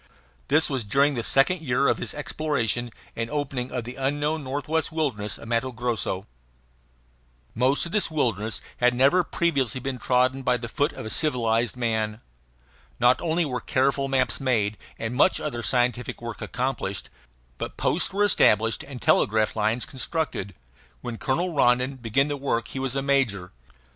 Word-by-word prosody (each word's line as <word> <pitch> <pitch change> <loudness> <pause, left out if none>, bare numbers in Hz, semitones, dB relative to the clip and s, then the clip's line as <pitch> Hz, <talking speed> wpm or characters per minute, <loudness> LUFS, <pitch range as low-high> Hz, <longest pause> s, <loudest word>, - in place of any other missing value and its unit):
This 155 +2 +4
was 135 -4 -2
during 140 +7 +2
the 120 - -2
second 135 +9 +3
year 135 -2 +1
of - - +2
his - - -3
exploration 145 -6 -1 0.3
and 115 0 -3
opening 135 -3 -3
of 125 -2 -3
the 120 +2 -8
unknown 145 +3 -1
northwestern 145 +4 -2
wilderness 120 -10 -1
of - - -11
Matto 120 +3 0
Grosso. 115 -5 -2 1.3
Most 130 +7 +2
of 170 - -6
this 210 +1 +1
wilderness 115 - 0 0.2
had 125 0 +3
never 140 +8 +4
previously 140 -8 0
been 130 0 -4
trodden 130 +2 +2
by 125 -1 +2
the 115 0 -6
foot 145 +5 0
of - - -8
a 110 - -4
civilized 120 -5 +1
man. 110 -3 -1 0.8
Not 125 +1 +4
only 165 0 +1
were 125 -4 -3
careful 135 +2 +1
maps 135 -1 +1
made 115 -6 +1 0.2
and 115 +1 -3
much 145 +9 +3
other 130 -6 -3
scientific 125 +1 +1
work 115 -3 -7
accomplished, 125 -6 -3 0.5
but - - -5
posts - - +1
were 200 +2 +1
established 115 - +3
and 135 -3 -9
telegraph 110 -1 +2
lines 110 +2 0
constructed. 130 - -3 0.5
When 115 -2 -6
Colonel 170 +7 -1
Rondon 125 -1 +2
began 125 +4 +1
the 145 -1 -2
work 120 -4 -1
he 135 - -5
was 135 0 -2
a 135 - 0
major. 125 -10 +1
130 Hz, 165 wpm, -25 LUFS, 115-140 Hz, 1.3 s, This